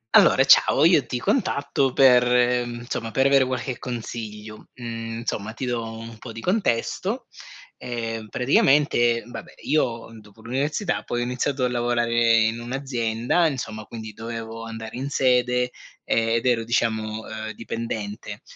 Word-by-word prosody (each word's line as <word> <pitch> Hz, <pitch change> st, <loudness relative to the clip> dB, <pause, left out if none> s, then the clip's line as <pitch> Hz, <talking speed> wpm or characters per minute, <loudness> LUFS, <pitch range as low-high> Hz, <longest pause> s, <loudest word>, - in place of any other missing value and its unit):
Allora, -, -, +6 dB
ciao, 150 Hz, -, +6 dB
io 170 Hz, -5 st, +5 dB
ti 125 Hz, -, -2 dB
contatto 140 Hz, -, 0 dB
per, 125 Hz, -2 st, +6 dB, 0.4 s
mhmm, 120 Hz, 0 st, -6 dB
insomma 120 Hz, -1 st, -4 dB
per 135 Hz, +4 st, +1 dB
avere 135 Hz, -1 st, +5 dB
qualche 130 Hz, 0 st, -3 dB
consiglio. 110 Hz, -3 st, -7 dB
Mhmm, 115 Hz, -2 st, -5 dB
insomma, 110 Hz, -2 st, -3 dB
ti 130 Hz, -, -5 dB
do 120 Hz, -2 st, -1 dB
un 115 Hz, 0 st, -9 dB
po' 115 Hz, -, -8 dB
di 115 Hz, -, -8 dB
contesto: 180 Hz, -, -1 dB, 0.5 s
ehm, 115 Hz, -3 st, -5 dB
praticamente, 125 Hz, -2 st, +3 dB
vabbè, 120 Hz, -, -9 dB
io 120 Hz, -8 st, 0 dB
dopo 105 Hz, +1 st, -18 dB
l'università, 145 Hz, -, -1 dB
poi 120 Hz, -, -3 dB
ho -, -, +1 dB
iniziato 125 Hz, +2 st, -1 dB
a 125 Hz, -, +2 dB
lavorare 120 Hz, -1 st, 0 dB, 0.3 s
in 110 Hz, +1 st, 0 dB
un'azienda, 120 Hz, +3 st, 0 dB
insomma, 110 Hz, -7 st, -4 dB
quindi 110 Hz, 0 st, -8 dB
dovevo 115 Hz, 0 st, -6 dB
andare 115 Hz, -1 st, -7 dB
in 135 Hz, +2 st, -3 dB
sede, 125 Hz, -2 st, +2 dB, 0.3 s
ed 115 Hz, +1 st, +1 dB
ero, 120 Hz, -3 st, +2 dB
diciamo, 110 Hz, -2 st, -1 dB
ehm, 110 Hz, 0 st, -5 dB
dipendente 110 Hz, -3 st, -5 dB
120 Hz, 140 wpm, -24 LUFS, 115-130 Hz, 0.5 s, Allora